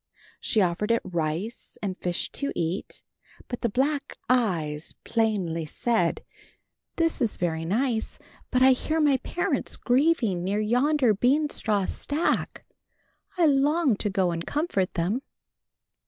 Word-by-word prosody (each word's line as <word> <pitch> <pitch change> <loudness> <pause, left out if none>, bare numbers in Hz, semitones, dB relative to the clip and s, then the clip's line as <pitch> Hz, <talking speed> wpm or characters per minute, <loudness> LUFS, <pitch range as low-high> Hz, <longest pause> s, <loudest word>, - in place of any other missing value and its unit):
She 215 - +2
offered 185 +4 0
it 230 0 +2
rice 170 +5 -3
and 190 -2 -2
fish 175 -1 -3
to 280 - -3
eat, 170 +4 -3 0.4
but 245 - -5
the 235 - +1
black 275 +5 -1
eyes 165 -12 0
plainly 190 -8 0
said, 220 0 0 0.7
"This 330 -4 +1
is 230 -4 +1
very 165 -2 -1
nice, 225 +5 0 0.3
but 255 0 +3
I 265 - +8
hear 310 +5 0
my 290 -3 +4
parents 355 - -1
grieving 245 - +2
near 200 +3 0
yonder 250 +3 +3
beanstraw 245 -4 +1
stack. 300 +4 -1 0.7
I 345 - +4
long 290 -1 +3
to 210 - -1
go 190 -3 +1
and 165 0 -3
comfort 285 - -1
them." 185 +9 0
225 Hz, 130 wpm, -26 LUFS, 180-275 Hz, 0.7 s, I